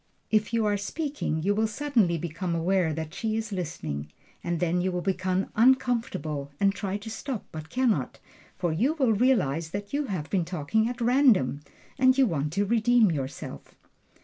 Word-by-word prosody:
If 215 Hz, 0 st, +2 dB
you 230 Hz, -2 st, +1 dB
are 205 Hz, -1 st, +2 dB
speaking 275 Hz, -, -3 dB
you 200 Hz, +3 st, +2 dB
will 220 Hz, +2 st, +1 dB
suddenly 225 Hz, -8 st, +1 dB
become 170 Hz, +2 st, -3 dB
aware 175 Hz, 0 st, +1 dB
that 160 Hz, +1 st, -5 dB
she 220 Hz, +2 st, -2 dB
is 220 Hz, -1 st, -4 dB
listening, 75 Hz, -, -4 dB, 0.3 s
and 170 Hz, -1 st, -1 dB
then 175 Hz, +1 st, +1 dB
you 185 Hz, +1 st, 0 dB
will 180 Hz, 0 st, -2 dB
become 185 Hz, 0 st, -1 dB
uncomfortable 225 Hz, -, +1 dB
and 195 Hz, 0 st, +3 dB
try 200 Hz, 0 st, -3 dB
to 210 Hz, +2 st, -9 dB
stop, 245 Hz, 0 st, -5 dB
but 155 Hz, 0 st, -8 dB
can 255 Hz, +4 st, +2 dB
not; -, -, -3 dB, 0.4 s
for 175 Hz, -3 st, 0 dB
you 255 Hz, -, +1 dB
will 260 Hz, -7 st, +3 dB
realize 185 Hz, -, +2 dB
that 200 Hz, +5 st, -6 dB
you 290 Hz, +1 st, 0 dB
have 180 Hz, -, -4 dB
been 190 Hz, -3 st, +2 dB
talking 180 Hz, +7 st, 0 dB
at 245 Hz, 0 st, -6 dB
random, 235 Hz, -, +3 dB, 0.4 s
and 260 Hz, 0 st, +5 dB
you 270 Hz, -, +6 dB
want 150 Hz, -, -1 dB
to 200 Hz, +2 st, +1 dB
redeem 230 Hz, -1 st, +4 dB
yourself. 135 Hz, -3 st, -6 dB
200 Hz, 180 wpm, -27 LUFS, 165-230 Hz, 0.4 s, you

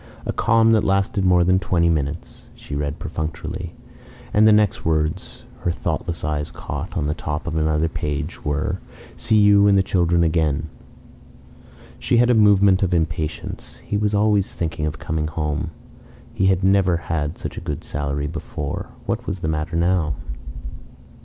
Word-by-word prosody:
".... -, -, -19 dB
A -, -, -2 dB
calm 115 Hz, 0 st, +4 dB
that 110 Hz, -2 st, +4 dB
lasted 95 Hz, 0 st, +1 dB
more 90 Hz, -1 st, +4 dB
than 90 Hz, +2 st, +3 dB
twenty 85 Hz, -3 st, +1 dB
minutes," 75 Hz, -1 st, -2 dB
she -, -, -10 dB
read 75 Hz, +1 st, -2 dB
perfunctorily; 80 Hz, +3 st, -5 dB, 0.6 s
and 105 Hz, +1 st, +6 dB
the -, -, +7 dB
next 105 Hz, -2 st, +3 dB
words 80 Hz, -1 st, -1 dB, 0.2 s
her -, -, -1 dB
thoughtless 85 Hz, 0 st, -3 dB
eyes 75 Hz, 0 st, -2 dB
caught, 75 Hz, +7 st, -6 dB
on 75 Hz, -, 0 dB
the 75 Hz, -, 0 dB
top 75 Hz, -1 st, -4 dB
of 85 Hz, -, -3 dB
another 80 Hz, 0 st, +1 dB
page, 75 Hz, 0 st, -4 dB
were: 75 Hz, +1 st, -1 dB, 0.4 s
"see 110 Hz, -, +2 dB
you 105 Hz, -1 st, +6 dB
and 100 Hz, -1 st, +5 dB
the 95 Hz, -, +4 dB
children 85 Hz, -2 st, +2 dB
again... 80 Hz, -2 st, +1 dB, 0.6 s
." -, -, -22 dB
She 120 Hz, -, +1 dB
had 120 Hz, +1 st, +5 dB
a -, -, +5 dB
movement 100 Hz, -3 st, +5 dB
of 90 Hz, -2 st, +2 dB
impatience. 80 Hz, -1 st, -3 dB
He -, -, -2 dB
was 105 Hz, 0 st, +1 dB
always 105 Hz, -1 st, +2 dB
thinking 80 Hz, -2 st, -3 dB
of 75 Hz, +1 st, -4 dB
coming 75 Hz, -1 st, -2 dB
home. 75 Hz, 0 st, -2 dB, 0.6 s
He 95 Hz, -, +1 dB
had 95 Hz, -1 st, +2 dB
never 95 Hz, -2 st, +3 dB
had 80 Hz, -2 st, -3 dB
such -, -, -6 dB
a -, -, -6 dB
good 75 Hz, -, -4 dB
salary 70 Hz, 0 st, -3 dB
before. 80 Hz, -1 st, -5 dB, 0.2 s
What -, -, -3 dB
was 95 Hz, -2 st, -3 dB
the 80 Hz, -, -2 dB
matter 80 Hz, +1 st, -2 dB
now? 85 Hz, -3 st, +1 dB
85 Hz, 170 wpm, -22 LUFS, 75-95 Hz, 0.6 s, the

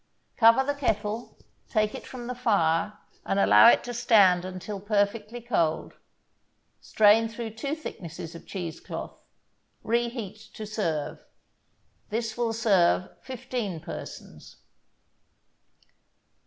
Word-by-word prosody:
Cover 230 Hz, +3 st, +6 dB
the 285 Hz, +2 st, -1 dB
kettle, 220 Hz, -4 st, -2 dB, 0.3 s
take 215 Hz, -2 st, +1 dB
it -, -, -8 dB
from 250 Hz, -2 st, -8 dB
the 250 Hz, -, -4 dB
fire 205 Hz, -6 st, +1 dB, 0.3 s
and 195 Hz, -, 0 dB
allow 215 Hz, -, +7 dB
it -, -, +6 dB
to 245 Hz, -, -6 dB
stand 205 Hz, -7 st, +4 dB
until 185 Hz, +2 st, -6 dB
perfectly 210 Hz, +3 st, -1 dB
cold. 170 Hz, -10 st, -1 dB, 0.9 s
Strain 220 Hz, +1 st, +4 dB
through 225 Hz, 0 st, -6 dB
two 275 Hz, +7 st, -4 dB
thicknesses 170 Hz, -, -8 dB
of 170 Hz, -, -12 dB
cheese 170 Hz, -4 st, -5 dB
cloth. -, -, -8 dB, 0.6 s
Reheat 235 Hz, -3 st, -2 dB, 0.2 s
to 215 Hz, -, -6 dB
serve. 170 Hz, -9 st, -3 dB, 0.9 s
This 225 Hz, +1 st, -3 dB
will 235 Hz, -1 st, 0 dB
serve 195 Hz, -5 st, +2 dB
fifteen 245 Hz, -8 st, -5 dB
persons. -, -, -9 dB
215 Hz, 115 wpm, -27 LUFS, 195-235 Hz, 0.9 s, allow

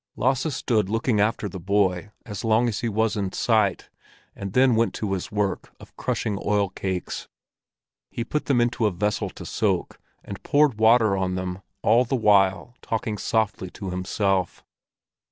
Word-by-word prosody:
Lasse 130 Hz, +5 st, +1 dB
stood 105 Hz, -6 st, 0 dB
looking 115 Hz, 0 st, +1 dB
after 105 Hz, 0 st, +1 dB
the 95 Hz, -1 st, -7 dB
boy 95 Hz, 0 st, +1 dB, 0.2 s
as 105 Hz, -3 st, -6 dB
long 115 Hz, +2 st, +3 dB
as 115 Hz, -, -2 dB
he 115 Hz, -, -1 dB
was 110 Hz, 0 st, 0 dB
in 100 Hz, -3 st, -2 dB
sight, 110 Hz, -5 st, +1 dB, 0.4 s
and 100 Hz, -1 st, -6 dB
then 130 Hz, -2 st, +4 dB
went 115 Hz, +1 st, +1 dB
to 105 Hz, -3 st, -2 dB
his 95 Hz, +4 st, -4 dB
work 105 Hz, -2 st, -2 dB
of -, -, -15 dB
crushing 105 Hz, -3 st, -2 dB
oilcakes. 95 Hz, -2 st, -2 dB, 0.8 s
He 115 Hz, -, -4 dB
put 150 Hz, +5 st, -3 dB
them 135 Hz, -4 st, +2 dB
into 120 Hz, -2 st, +1 dB
a -, -, 0 dB
vessel 100 Hz, +3 st, -1 dB
to -, -, -10 dB
soak, -, -, -1 dB, 0.3 s
and -, -, -8 dB
poured 145 Hz, -6 st, +2 dB
water 110 Hz, -2 st, +5 dB
on 95 Hz, -1 st, -1 dB
them, 90 Hz, 0 st, -4 dB, 0.2 s
all 115 Hz, +4 st, +5 dB
the 130 Hz, +2 st, -1 dB
while 100 Hz, -1 st, +3 dB
talking 110 Hz, -2 st, -3 dB
softly 110 Hz, -4 st, -1 dB
to 95 Hz, 0 st, -7 dB
himself. 95 Hz, 0 st, -1 dB
105 Hz, 165 wpm, -24 LUFS, 95-115 Hz, 0.8 s, water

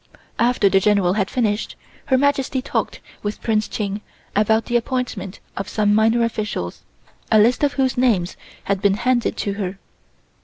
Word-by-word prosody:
After 240 Hz, -3 st, +3 dB
the 195 Hz, 0 st, +4 dB
General 195 Hz, -3 st, +3 dB
had 195 Hz, -1 st, 0 dB
finished, 220 Hz, -4 st, -1 dB, 0.3 s
Her 260 Hz, -, +4 dB
Majesty 275 Hz, -1 st, +1 dB
talked 255 Hz, -, -3 dB, 0.2 s
with 205 Hz, 0 st, -4 dB
Prince 215 Hz, -2 st, +1 dB
Ching 205 Hz, -1 st, -3 dB, 0.3 s
about 220 Hz, +2 st, +3 dB
the 240 Hz, -, -2 dB
appointment 240 Hz, -6 st, -2 dB, 0.2 s
of 195 Hz, -, -4 dB
some 210 Hz, -1 st, +2 dB
minor 225 Hz, +2 st, +3 dB
officials, 210 Hz, -, -3 dB, 0.5 s
a 220 Hz, -, +6 dB
list 235 Hz, +6 st, +4 dB
of 285 Hz, -1 st, +2 dB
whose 260 Hz, -2 st, 0 dB
names 210 Hz, -9 st, +2 dB, 0.3 s
had 195 Hz, -1 st, -1 dB
been 200 Hz, -1 st, +3 dB
handed 240 Hz, +2 st, 0 dB
to 200 Hz, -, -1 dB
her. 190 Hz, 0 st, -3 dB
215 Hz, 160 wpm, -21 LUFS, 200-245 Hz, 0.5 s, a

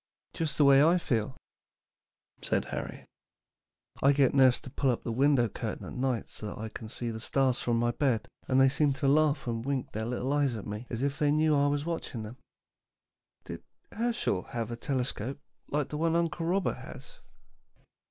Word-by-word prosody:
"Just 160 Hz, -4 st, -2 dB
the 145 Hz, -, +5 dB
way 140 Hz, 0 st, +7 dB
I 170 Hz, +3 st, +5 dB
feel," 125 Hz, -6 st, -1 dB, 1.0 s
said -, -, 0 dB
Harry. -, -, -6 dB, 1.0 s
"I 140 Hz, +1 st, +5 dB
get 135 Hz, -2 st, +3 dB
nurse 130 Hz, -3 st, +5 dB
to 130 Hz, -, -10 dB
pull 135 Hz, -, 0 dB
up 120 Hz, -, 0 dB
the 115 Hz, -, -3 dB
window 130 Hz, 0 st, +3 dB
curtain -, -, -5 dB
at -, -, -8 dB
night 125 Hz, -2 st, -1 dB
so 105 Hz, -, -8 dB
that 105 Hz, -, -7 dB
I 110 Hz, +1 st, -5 dB
can 110 Hz, 0 st, -8 dB
see 120 Hz, 0 st, -4 dB
the 110 Hz, -, -6 dB
stars 130 Hz, +2 st, +1 dB
from 120 Hz, -1 st, 0 dB
my 120 Hz, +1 st, +2 dB
bed, 120 Hz, -4 st, 0 dB, 0.2 s
and 130 Hz, 0 st, +3 dB
they 135 Hz, -, +7 dB
seem 140 Hz, +1 st, +2 dB
to 140 Hz, +1 st, -1 dB
laugh 150 Hz, +1 st, +3 dB
and 115 Hz, -2 st, -2 dB
wink 135 Hz, -1 st, -2 dB
their 110 Hz, +1 st, -3 dB
little 125 Hz, +3 st, -1 dB
eyes 140 Hz, -4 st, +1 dB
at 105 Hz, -, -6 dB
me 105 Hz, +4 st, -6 dB
as 120 Hz, +2 st, -3 dB
if 140 Hz, 0 st, -1 dB
they 150 Hz, -, +3 dB
knew 155 Hz, +1 st, +3 dB
I 140 Hz, 0 st, +3 dB
was 145 Hz, +1 st, 0 dB
watching 160 Hz, -9 st, -4 dB
them. 110 Hz, +4 st, -9 dB, 1.1 s
Did -, -, -7 dB, 0.3 s
Herschel 230 Hz, -, -1 dB
have 115 Hz, +2 st, -5 dB
a -, -, -3 dB
telescope 130 Hz, 0 st, -3 dB, 0.3 s
like 145 Hz, -1 st, -1 dB
the 150 Hz, -, -4 dB
one 165 Hz, 0 st, +2 dB
Uncle 170 Hz, 0 st, 0 dB
Robert 190 Hz, +3 st, 0 dB
has?" -, -, -11 dB
135 Hz, 195 wpm, -29 LUFS, 120-145 Hz, 1.1 s, way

